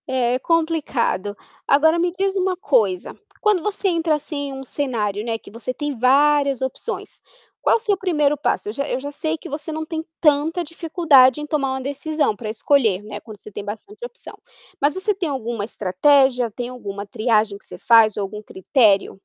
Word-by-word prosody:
é 255 -2 +1
complicado. 290 - 0 0.3
Agora 320 +4 +4
me 350 +1 +1
diz 390 0 0
uma 370 -1 0
coisa, 215 - 0 0.2
quando 420 -5 +2
você 405 0 -1
entra 330 -2 +1
assim 285 -1 -5
em 270 - -6
um 270 0 -7
cenário, 220 -7 -2
né, 230 -1 -2
que - - -15
você 230 +3 -5
tem 290 -2 -4
várias 280 +1 +3
opções, 265 - -5 0.4
qual - - +4
o - - -4
seu 425 -3 +1
1º 300 -6 +1
passo? 285 - -1
Eu - - -3
já 280 +5 -3
eu 250 - -1
já 285 +2 -6
sei 315 +1 -2
que - - -10
você 300 +2 -5
não 315 0 -4
tem 320 0 -4 0.2
tanta 310 +3 +2
dificuldade 310 -5 +4
em 300 - -5
tomar 285 -3 -1
uma 265 - -3
decisão 285 0 -1
para 215 0 -5
escolher, 220 -3 +2
né, 210 0 -7
quando 215 -3 -12
você 215 - -12
tem 200 - -6
bastante 225 - -8
opção. - - -10 0.5
Mas 285 +1 +2
você 385 +3 -1
tem 365 -4 -2
alguma 235 -6 -3
estratégia, 245 +5 +2
tem 240 +3 -5
alguma 205 -5 -7
triagem 215 -1 +1
que - - -18
você - - -11
faz 225 -3 +5
ou 205 - -1
algum 210 +2 -7
critério? 205 0 +2
275 Hz, 195 wpm, -21 LUFS, 225-315 Hz, 0.5 s, faz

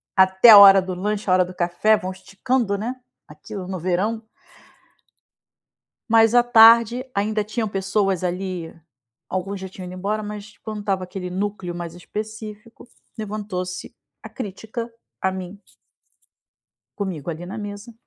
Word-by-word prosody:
até 190 +4 +6
a 210 - +11
hora 195 -1 +9
do 185 0 -5
lanche, 205 +1 -3
a - - +5
hora 185 0 +5
do 180 +1 -9
café, 180 +5 +2
vão 185 +1 -5
esticando, 200 +3 -2
né, 240 +5 -4 0.3
aquilo 180 +5 -9
no 190 -1 -4
verão 195 +6 -1 1.9
mas 225 +1 +5
à 240 - +6
tarde 235 +1 +6
ainda 210 +1 0
tinham 215 +1 -3
pessoas 195 -1 -1
ali, 180 -2 -4 0.6
alguns 190 +1 -3
já 190 - -6
tinham 185 -1 -10
ido 180 - -8
embora, 205 +3 -2
mas 210 0 -8
quando 215 -2 -7
tava 190 -2 -1
aquele 180 0 -6
núcleo 190 -1 -4
mais 170 -1 -6
específico, 215 +4 -8 0.3
levantou-se 200 -4 -5 0.3
a - - -10
crítica 230 +1 -6 0.3
a 190 - +1
mim 190 +1 -7 1.4
comigo 180 -7 -4
ali 170 +2 -6
na 190 - -7
mesa 205 +2 -8
200 Hz, 145 wpm, -22 LUFS, 185-215 Hz, 1.9 s, a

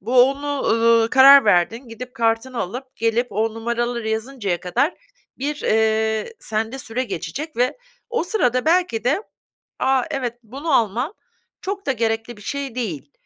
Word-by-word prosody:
bu 245 +5 +5
onu, 285 0 -3
ııı, 230 0 +4
karar 275 +1 +8
verdin. 220 +6 +2
Gidip 250 +3 -9
kartını 235 +1 0
alıp 250 +8 -6
gelip 230 +2 +1
o 220 +2 0
numaraları 235 0 -2
yazıncaya 220 -5 -2
kadar 280 - 0 0.4
bir, 290 +3 -2
eee, 220 - +1
sende 225 +4 -3
süre 255 +1 -3
geçecek 225 - -5
ve 250 - +1 0.3
o 470 -7 0
sırada 255 - +1
belki 320 - +2
de 300 - +1 0.6
a, 265 -1 +2
evet, 245 -4 -3
bunu 275 +8 -5
almam 240 - +1 0.5
çok 395 +1 -4
da 270 - +2
gerekli 225 -1 -2
bir - - -14
şey 275 +2 -4
değil, 165 - -4
240 Hz, 150 wpm, -21 LUFS, 225-270 Hz, 0.6 s, karar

